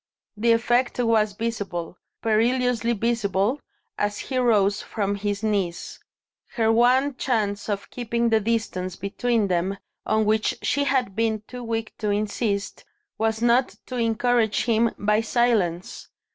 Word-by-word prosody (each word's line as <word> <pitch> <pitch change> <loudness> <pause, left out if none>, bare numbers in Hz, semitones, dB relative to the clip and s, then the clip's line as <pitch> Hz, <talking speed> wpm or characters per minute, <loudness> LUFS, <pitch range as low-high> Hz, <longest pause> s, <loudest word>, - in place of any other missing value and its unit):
The 230 +2 +2
effect 240 +2 +2
was 225 -4 +2
visible, 200 -6 -4 0.3
perilously 235 +1 +2
visible, 225 +1 0 0.4
as 205 0 0
he 260 -2 -2
rose 210 -4 +3
from 200 -2 -2
his 205 +1 -3
knees. 195 -5 -2 0.6
Her 225 -2 +3
one 255 +5 +3
chance 210 -5 -1
of 200 -1 -3
keeping 235 -1 -1
the 220 -1 +4
distance 205 -4 -2
between 220 +2 0
them, 185 +2 0 0.3
on 220 0 +2
which 215 +1 +1
she 285 +1 +1
had 255 -8 0
been 220 -1 0
too 250 -1 -8
weak 225 -1 -3
to 210 - -1
insist, 205 0 -2 0.4
was 220 +1 0
not 240 +2 +3
to 255 - -5
encourage 230 -1 +1
him 230 -1 +3
by 210 +1 +2
silence. 215 -7 0
220 Hz, 135 wpm, -24 LUFS, 205-235 Hz, 0.6 s, the